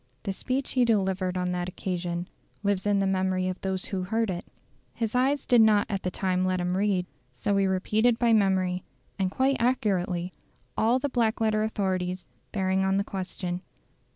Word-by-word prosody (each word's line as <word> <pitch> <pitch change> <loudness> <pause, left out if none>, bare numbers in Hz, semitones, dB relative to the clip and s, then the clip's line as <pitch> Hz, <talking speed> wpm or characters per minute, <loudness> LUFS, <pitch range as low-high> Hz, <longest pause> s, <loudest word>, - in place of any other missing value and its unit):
The 195 - -2
speech 255 +6 -2
he 255 - +3
delivered 190 -5 +1
on 180 0 -1
that 180 0 -2
occasion 175 -1 -3 0.4
lives 200 -1 +1
in 205 -1 +3
the 195 - +2
memory 185 -1 +1
of 185 - -5
those 190 -1 -2
who 190 -2 -3
heard 220 +3 0
it. 175 -1 -5 0.5
His 225 -2 -2
eyes 265 +3 +2
did 245 -2 +5
not 215 -2 +5
at 195 -1 -1
that 180 - -3
time 185 -1 0
let 185 0 +1
him 180 +1 0
read, 195 -2 +1 0.3
so 160 +12 -1
he 195 -1 +3
repeated 215 +5 +2
by 235 -1 +3
memory, 185 -3 +2 0.4
and 190 -1 +1
quite 265 +6 +1
accurately, 190 -7 0 0.4
all 230 +3 +3
the 285 - -1
black 235 -4 +1
letter 215 -1 +2
authorities, 185 -4 -1 0.3
bearing 190 -1 +1
on 190 0 +2
the 200 - +2
question. 185 -2 -4
190 Hz, 180 wpm, -27 LUFS, 185-220 Hz, 0.5 s, did